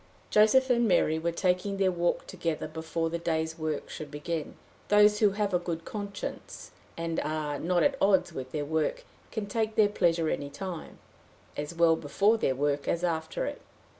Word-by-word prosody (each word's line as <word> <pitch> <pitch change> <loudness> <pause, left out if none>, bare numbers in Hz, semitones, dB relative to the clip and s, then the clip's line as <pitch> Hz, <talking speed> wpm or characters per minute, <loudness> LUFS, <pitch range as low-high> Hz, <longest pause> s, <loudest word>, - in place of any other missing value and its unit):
Joseph 255 +5 +5
and 240 -1 +3
Mary 160 -4 +3
were 170 +1 -1
taking 185 +3 0
their 190 -1 +3
walk 175 -1 0
together 160 -2 -3
before 160 +1 -3
the 170 - -2
day's 160 -1 -2
work 155 -2 -2
should 155 - -7
begin. 150 +2 -4 0.3
Those 210 0 +5
who 210 - +5
have 205 -2 0
a 180 - +3
good 170 -2 -4
conscience, 200 -2 -6 0.3
and 165 0 -2
are 150 -2 -2
not 175 +1 +1
at 275 -1 +1
odds 185 -3 +3
with 130 -3 -6
their 150 -2 -2
work, 160 +1 -1 0.2
can 220 -2 -3
take 220 +1 -1
their 210 -2 +5
pleasure 170 -5 +2
any 145 -2 -2
time 175 +3 -7 0.6
as 150 +3 -5
well 165 -1 +5
before 200 +9 +2
their 130 - +1
work 145 +1 0
as 170 - 0
after 170 - -1
it. - - -5
170 Hz, 180 wpm, -29 LUFS, 160-205 Hz, 0.6 s, Joseph